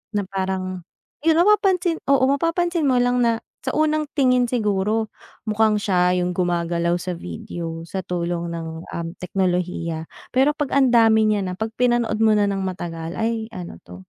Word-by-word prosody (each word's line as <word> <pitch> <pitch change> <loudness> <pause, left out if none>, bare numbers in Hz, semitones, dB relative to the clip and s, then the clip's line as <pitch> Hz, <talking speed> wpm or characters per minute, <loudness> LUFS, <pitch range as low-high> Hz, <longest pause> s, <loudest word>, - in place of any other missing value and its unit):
Na 205 - +1
parang, 190 -2 -3 0.4
yun 325 -1 +5
mapapansin 360 -2 +3
oo, 275 -1 +4
mapapansin 330 +1 +1
mo 255 - +3
lang 245 0 +2
na 230 -2 +2 0.2
sa - - -2
unang 310 0 +1
tingin 250 -3 +3
siguro 215 -1 0 0.3
mukhang 215 0 +2
siya 180 -3 +2
yung 180 - -1
gumagalaw 170 -1 0
sa 175 +1 -3
video 165 - -6
sa 190 +3 -5
tulong 170 -1 -2
ng, 165 -1 -5 0.2
um, 170 0 -5
teknolohiya. 180 -3 -2 0.2
Pero 270 +4 +3
‘pag 295 -3 -3
ang 275 -2 +4
dami 225 -2 +5
niya 210 -1 +1
na, 185 - -3
‘pag 220 0 -3
pinanood 240 -3 +1
mo 220 - +5
na 210 -1 +3
nang 195 -1 -1
matagal, 170 -3 -5
ay 225 0 -2
ano 180 - -7
'to. 90 +1 -12
210 Hz, 165 wpm, -22 LUFS, 175-250 Hz, 0.4 s, yun